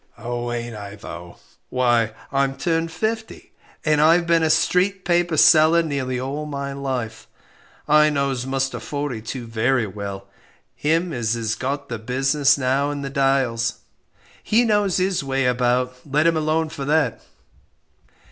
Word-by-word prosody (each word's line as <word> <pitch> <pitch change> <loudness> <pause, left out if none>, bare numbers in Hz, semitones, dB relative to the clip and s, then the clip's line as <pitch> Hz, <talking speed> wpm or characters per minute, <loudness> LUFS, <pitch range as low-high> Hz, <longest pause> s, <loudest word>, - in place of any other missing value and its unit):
Oh, 120 0 -4
ain't 120 -1 -4
I 100 -1 -8
though; 85 -4 -10 0.3
why 120 -3 +1 0.2
I'm 135 0 0
turned 165 -1 -1
fifty, 220 +6 -4 0.3
and 155 -1 +3
I've 165 +3 +5
been 170 -1 +3
a 160 - +2
'street 185 +4 +2
paper' 175 -2 +1
seller 160 +2 +6
nearly 135 -5 -2
all 140 +4 -4
my 140 -1 -4
life. 130 -5 -4 0.6
I 150 0 +5
knows 140 -3 -1
Muster 135 -2 -1
Fortey 140 -1 -4
too 120 +2 -6
very 115 +2 +1
well; 100 -1 -7 0.5
him 165 +3 0
as 120 -2 -1
is 115 -2 -2
got 140 +4 -3
the 115 -2 -5
business 135 +5 +2
now 135 +2 +1
in 145 -1 -4
the 135 - -5
Dials 135 -4 +1 0.7
he 235 +3 +2
knows 205 -4 +2
his 185 -3 0
way 135 -1 -1
about, 125 0 +1
let 150 +2 +1
him 165 0 +4
alone 155 +1 0
for 140 - -6
that." 145 -5 +1
135 Hz, 150 wpm, -22 LUFS, 120-155 Hz, 0.7 s, seller